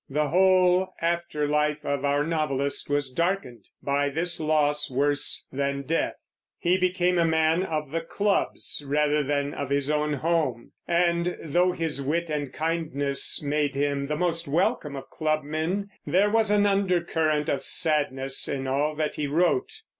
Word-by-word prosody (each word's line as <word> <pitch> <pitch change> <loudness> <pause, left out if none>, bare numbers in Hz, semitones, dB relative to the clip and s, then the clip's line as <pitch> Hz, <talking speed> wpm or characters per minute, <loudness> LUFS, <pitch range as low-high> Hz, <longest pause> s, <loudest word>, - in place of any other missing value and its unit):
The 150 +1 0
whole 185 0 +3
after 170 -3 -1
life 150 0 0
of 140 -1 -1
our 145 0 +2
novelist 140 -4 -1
was 145 -2 0
darkened 170 - -2 0.2
by 145 0 +1
this 170 +4 0
loss 150 -1 +1
worse 145 +2 0
than 140 0 -2
death. 165 +5 -1 0.4
He 175 +1 +2
became 180 -1 +1
a - - +4
man 160 +1 +2
of 155 -6 -3
the 165 +1 -1
clubs, 200 -3 -1
rather 150 +1 +1
than 145 0 -1
of 140 - -4
his 140 +1 0
own 150 0 0
home, 145 -5 -1 0.2
and 170 0 +1
though 175 +4 +2
his 160 -5 -2
wit 160 +4 -1
and 145 -3 -3
kindness 155 -4 0
made 145 -1 0
him 140 0 -1
the 150 +1 -2
most 170 -1 -1
welcome 160 - 0
of 135 0 -8
clubmen, 155 +5 -2
there 200 +4 +2
was 220 -1 +3
an 205 0 +3
undercurrent 170 -6 +1
of 140 - 0
sadness 135 -4 +1
in 135 -1 -3
all 145 +3 0
that 155 0 -2
he 150 - -1
wrote. 180 - +1
150 Hz, 155 wpm, -26 LUFS, 145-170 Hz, 0.4 s, a